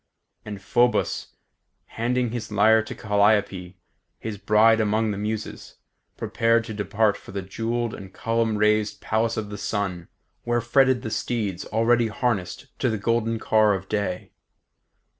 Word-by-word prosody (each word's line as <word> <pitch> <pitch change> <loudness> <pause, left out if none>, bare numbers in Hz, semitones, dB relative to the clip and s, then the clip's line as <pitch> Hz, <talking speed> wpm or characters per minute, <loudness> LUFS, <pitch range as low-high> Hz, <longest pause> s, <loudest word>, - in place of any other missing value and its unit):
And 105 -1 -7
Phoebus, 110 +4 0 0.5
handing 120 +1 -1
his 115 -3 -5
lyre 110 +2 +5
to 110 - -8
Calliope, 100 -3 +1 0.4
his 110 -3 -6
bride 110 +2 +4
among 110 +1 +1
the 100 - -4
Muses, 110 +1 -5 0.4
prepared 115 0 +1
to 110 - -6
depart 105 +1 +1
for - - -13
the 100 -1 -3
jewelled 115 +4 -3
and 95 -1 -9
column 115 0 -1
raised 105 -1 +1
Palace 110 +2 -1
of 105 -2 -4
the 105 - -6
Sun, 95 -5 -3 0.4
where 120 0 +1
fretted 130 +1 +3
the 110 - -4
steeds 105 -8 -2
already 115 +1 +2
harnessed 110 -6 -2
to - - +1
the 110 - -1
golden 115 +2 0
car 110 -2 +3
of 95 0 -7
day. 100 -4 -3
110 Hz, 145 wpm, -24 LUFS, 105-115 Hz, 0.5 s, lyre